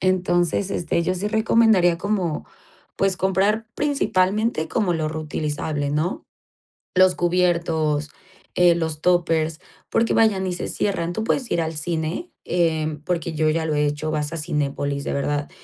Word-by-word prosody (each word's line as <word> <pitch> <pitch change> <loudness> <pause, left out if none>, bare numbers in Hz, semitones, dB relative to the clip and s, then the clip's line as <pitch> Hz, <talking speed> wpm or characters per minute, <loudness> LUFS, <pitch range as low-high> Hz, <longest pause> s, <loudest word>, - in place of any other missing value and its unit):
Entonces, 185 0 +1
este, 170 -2 0
yo 185 +2 0
sí 200 +3 -2
recomendaría 220 -5 +3
como, 190 -6 -2 0.5
pues 195 -1 +1
comprar 200 +4 +1
principalmente 215 - +1
como 180 -2 0
lo 155 -1 -1
reutilizable, 150 -1 -3
¿no? 155 +5 -1 0.7
Los 185 0 +5
cubiertos, 170 -4 +1 0.4
eh, 175 -1 +5
los 160 -2 -2
tuppers, 165 -2 +1 0.3
porque 230 - +2
vaya 220 -3 +4
ni 185 -1 -2
se 175 - -4
cierran. 175 -4 -1
Tú 220 - -2
puedes 250 +1 -1
ir 170 - +1
al 160 0 -3
cine, 165 - -2
eh, 160 -3 0
porque 170 -2 -1
yo 155 0 +1
ya 160 +1 0
lo 155 -1 -1
he 150 0 +2
hecho, 150 +2 -2
vas 150 +1 -2
a - - -3
Cinépolis, 145 -3 -2
de - - -2
verdad, 145 +1 -1
170 Hz, 155 wpm, -22 LUFS, 155-185 Hz, 0.7 s, Los